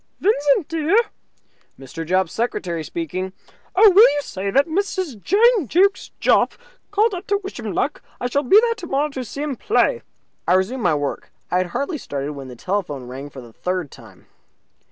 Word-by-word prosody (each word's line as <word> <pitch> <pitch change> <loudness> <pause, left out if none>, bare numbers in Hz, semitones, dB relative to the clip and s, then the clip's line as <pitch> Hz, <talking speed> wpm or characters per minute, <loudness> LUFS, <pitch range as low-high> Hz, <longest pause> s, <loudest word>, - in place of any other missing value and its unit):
"Vincent, 295 -4 +2
dear?" 330 +4 +1 0.8
"Mr. 135 +5 -7
Jopp's 185 +1 0
secretary 180 -8 -2
speaking." 190 - -4 0.4
"Oh, 425 +4 +7
will 410 +5 +8
you 290 - -1
say 200 -7 -4
that 275 +7 +3
Mrs. 350 - -2
Jane 430 - +3
Jukes 385 - +2
Jopp - - +3 0.4
called 420 +2 +2
up 365 +2 -6
to 405 - +2
wish 390 - -7
him - - -4
luck? - - -1 0.2
I - - -4
shall 280 +3 +1
be 380 +10 +6
there 465 0 +2
tomorrow 300 -8 -2
to 265 -3 -5
see 280 +5 -6
him 295 -3 -2
play." 460 - +1 0.5
I - - +4
resumed 210 +8 0
my 175 -6 +2
work. 145 -1 -4 0.2
I 180 - +2
had 185 - 0
hardly 280 - -3
started 145 - -4
when 135 -2 -8
the 125 - -9
telephone 170 - -3
rang 135 +3 -7
for 135 -2 -10
the 120 -2 -14
third 180 -2 -3
time. 100 -6 -15
260 Hz, 185 wpm, -21 LUFS, -, 0.8 s, will